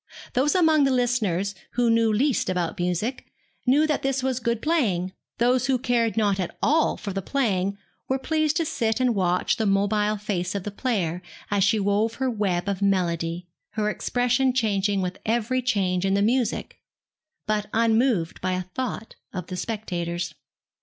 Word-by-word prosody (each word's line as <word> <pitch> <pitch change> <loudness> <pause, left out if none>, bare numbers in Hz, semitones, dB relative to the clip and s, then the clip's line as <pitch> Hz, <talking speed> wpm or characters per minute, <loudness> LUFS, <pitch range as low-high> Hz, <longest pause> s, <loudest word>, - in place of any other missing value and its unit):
Those 275 +6 +2
among 320 -4 +4
the - - +3
listeners 220 -7 +1 0.2
who 240 -1 +2
knew 230 -1 +3
least 250 0 +1
about 180 +1 -2
music, 180 +8 -2 0.4
knew 285 +5 +5
that 305 -2 0
this 270 -1 -1
was 260 -1 0
good 235 -2 -1
playing; 210 - 0 0.2
those 245 +2 +2
who 265 -1 +3
cared 235 -2 0
not 205 -3 +2
at 180 - -3
all 315 +2 +2
for 200 - -5
the 195 - -2
playing 200 -5 0 0.3
were 265 - +2
pleased 310 +2 0
to 330 - +1
sit 230 -7 -1
and 250 -2 +2
watch 180 -1 +1
the 220 -3 0
mobile 205 +2 +2
face 190 -3 -2
of 200 - -2
the 205 - -4
player 195 -7 -1 0.3
as 200 -1 +3
she 205 +2 +3
wove 205 +3 +1
her 260 -1 -1
web 195 -5 -1
of 200 -1 -2
melody, 175 -3 0 0.3
her 210 -1 0
expression 245 +3 +1
changing 205 -5 +1
with 180 0 -4
every 235 +3 0
change 195 -7 0
in 195 0 +2
the 200 - +2
music, 240 +1 0 0.7
but 210 -1 -1
unmoved 225 -5 +2
by 185 - 0
a 185 0 -1
thought 250 -3 -4 0.2
of 180 -3 -5
the 185 - -6
spectators. 175 -5 -3
215 Hz, 175 wpm, -25 LUFS, 190-250 Hz, 0.7 s, knew